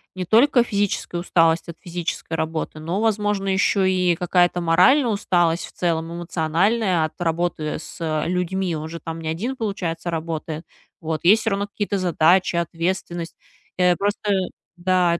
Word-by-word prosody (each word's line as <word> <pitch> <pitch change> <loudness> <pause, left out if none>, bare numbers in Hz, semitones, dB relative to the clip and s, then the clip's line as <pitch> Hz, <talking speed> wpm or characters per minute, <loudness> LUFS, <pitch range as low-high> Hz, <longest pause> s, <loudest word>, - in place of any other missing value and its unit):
не 185 - -3
только 240 +5 +5
физическая 200 -5 -1
усталость 165 -2 +2
от 170 - -7
физической 175 -1 -5
работы, 160 -1 -3
но, 170 +6 -2
возможно, 210 -3 0
еще 190 0 +2
и 180 -2 +2
какая-то 175 +1 +2
моральная 245 - +5
усталость 175 -5 +1
в - - -15
целом, 165 -1 -1
эмоциональная 175 +3 +1
от 155 - -9
работы 165 -2 -1
с, - - -11
э, 155 -1 -1
людьми. 180 -1 -1
Он 155 - -5
же 165 +1 -7
там 165 0 -6
не 160 - -6
один, 225 +12 -3
получается, 180 -6 -3
работает. 160 -1 -4 0.4
Вот, 160 0 -3
есть 215 +4 +6
всё 225 - 0
равно 200 +1 -1
какие-то 200 0 -2
задачи, 180 0 +3
ответственность. 170 0 -2 0.4
Э. 180 -1 +4
Просто 205 +1 -1 0.5
да. 175 -1 +2
175 Hz, 155 wpm, -22 LUFS, 165-195 Hz, 0.5 s, есть